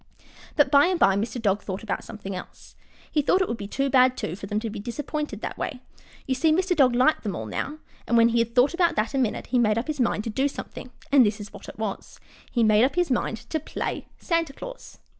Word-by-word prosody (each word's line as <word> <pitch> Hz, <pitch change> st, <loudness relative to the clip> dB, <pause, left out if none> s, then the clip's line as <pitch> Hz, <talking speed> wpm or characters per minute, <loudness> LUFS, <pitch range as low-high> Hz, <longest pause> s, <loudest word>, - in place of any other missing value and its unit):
But 290 Hz, -, +3 dB
by 285 Hz, +3 st, +6 dB
and 365 Hz, -2 st, 0 dB
by 195 Hz, -7 st, +5 dB
Mr. 225 Hz, +5 st, -2 dB
Dog 205 Hz, -2 st, +1 dB
thought 190 Hz, +1 st, -5 dB
about 220 Hz, -, -3 dB
something 200 Hz, -3 st, -7 dB
else. 180 Hz, -, -10 dB, 0.4 s
He 305 Hz, -, +2 dB
thought 360 Hz, +6 st, +3 dB
it 375 Hz, -, +1 dB
would -, -, -2 dB
be 200 Hz, -, -5 dB
too 275 Hz, +6 st, -1 dB
bad, 255 Hz, -1 st, +4 dB
too, 165 Hz, -, -3 dB
for 200 Hz, +1 st, -8 dB
them 210 Hz, +1 st, -1 dB
to 225 Hz, -, -3 dB
be 215 Hz, -, -6 dB
disappointed 255 Hz, +1 st, -4 dB
that -, -, -5 dB
way. 255 Hz, -, -3 dB, 0.5 s
You 265 Hz, -, 0 dB
see, 310 Hz, +5 st, +2 dB
Mr. 360 Hz, +3 st, +2 dB
Dog 260 Hz, -5 st, +4 dB
liked 255 Hz, +5 st, +3 dB
them 200 Hz, -5 st, -3 dB
all 110 Hz, -, -5 dB
now, 275 Hz, -, -4 dB, 0.3 s
and 235 Hz, -, +3 dB
when 230 Hz, 0 st, +6 dB
he 235 Hz, 0 st, +2 dB
had 230 Hz, 0 st, -1 dB
thought 255 Hz, +5 st, +4 dB
about 345 Hz, -1 st, +2 dB
that 215 Hz, +4 st, 0 dB
a 270 Hz, -, +1 dB
minute 240 Hz, -5 st, -1 dB
he 250 Hz, -, +4 dB
made 215 Hz, -2 st, +3 dB
up 230 Hz, -, -1 dB
his 305 Hz, -2 st, -4 dB
mind 230 Hz, -4 st, +1 dB
to 225 Hz, -, -4 dB
do 270 Hz, +5 st, +1 dB
something. 270 Hz, -, -8 dB, 0.2 s
And 275 Hz, -2 st, +7 dB
this 210 Hz, 0 st, 0 dB
is 205 Hz, 0 st, -9 dB
what -, -, -10 dB
it -, -, -11 dB
was 215 Hz, -3 st, -5 dB, 0.3 s
he 235 Hz, -, +2 dB
made 215 Hz, 0 st, +5 dB
up 265 Hz, +2 st, +2 dB
his 355 Hz, -5 st, +1 dB
mind 235 Hz, -2 st, -2 dB
to 315 Hz, -, 0 dB
play 310 Hz, -, -4 dB
Santa 330 Hz, -5 st, -1 dB
Claus! -, -, -10 dB
245 Hz, 255 wpm, -25 LUFS, 215-290 Hz, 0.5 s, And